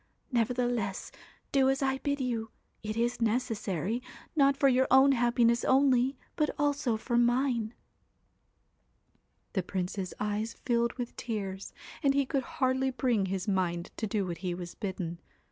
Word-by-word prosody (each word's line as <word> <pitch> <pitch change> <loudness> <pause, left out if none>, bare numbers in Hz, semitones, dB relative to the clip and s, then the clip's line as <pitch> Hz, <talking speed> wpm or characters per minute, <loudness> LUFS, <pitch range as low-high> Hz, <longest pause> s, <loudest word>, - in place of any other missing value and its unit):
Nevertheless, 240 -4 0 0.4
do 265 -1 +4
as 270 +1 +1
I 265 0 +1
bid 285 0 -1
you; 235 -4 -2 0.3
it 215 0 -4
is 240 +1 0
necessary, 225 - -1 0.3
not 275 -2 +4
for 275 - +4
your 260 0 +4
own 265 +2 +7
happiness 240 -1 +3
only, 265 -1 +3 0.2
but 300 -1 +1
also 285 -5 +1
for 240 +2 0
mine.' 240 -2 +1 1.8
The 190 - +1
Prince's 185 +1 -3
eyes 210 +2 -2
filled 235 -1 +2
with 245 -2 -5
tears, 195 -4 -4 0.3
and 275 -3 +3
he 280 -1 +3
could 275 0 0 0.2
hardly 260 -1 +2
bring 245 -6 +1
his 190 +1 -3
mind 175 -3 0
to 220 - -2
do 205 -2 0
what 170 -2 -5
he 180 -1 -2
was 175 -1 -7
bidden. 185 -5 -4
235 Hz, 145 wpm, -30 LUFS, 205-265 Hz, 1.8 s, own